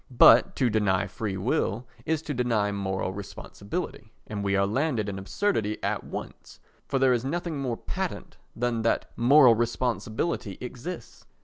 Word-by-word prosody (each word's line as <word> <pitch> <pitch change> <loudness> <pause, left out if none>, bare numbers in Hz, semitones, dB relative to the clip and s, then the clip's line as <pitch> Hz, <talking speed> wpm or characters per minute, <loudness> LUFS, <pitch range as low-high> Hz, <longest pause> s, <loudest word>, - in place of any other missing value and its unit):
But 120 +1 +7
to 125 -4 +2
deny 100 -3 +2
free 100 +1 -4
will 110 +1 0 0.2
is 160 0 0
to 150 - -3
deny 115 -5 +1
moral 95 -2 -2
responsibility, 100 - -6
and 105 -1 -4
we 100 0 +1
are 100 0 +3
landed 120 0 0
in 100 -1 -4
absurdity 110 - -1
at - - -1
once—for - - -7
there 130 -1 +4
is 120 -1 0
nothing 165 +2 -3
more 125 -4 -2
patent - - -5 0.2
than 120 -1 0
that 115 - 0
moral 130 +1 +7
responsibility 115 - -1
exists. 125 - -8
115 Hz, 145 wpm, -27 LUFS, 100-130 Hz, 0.2 s, But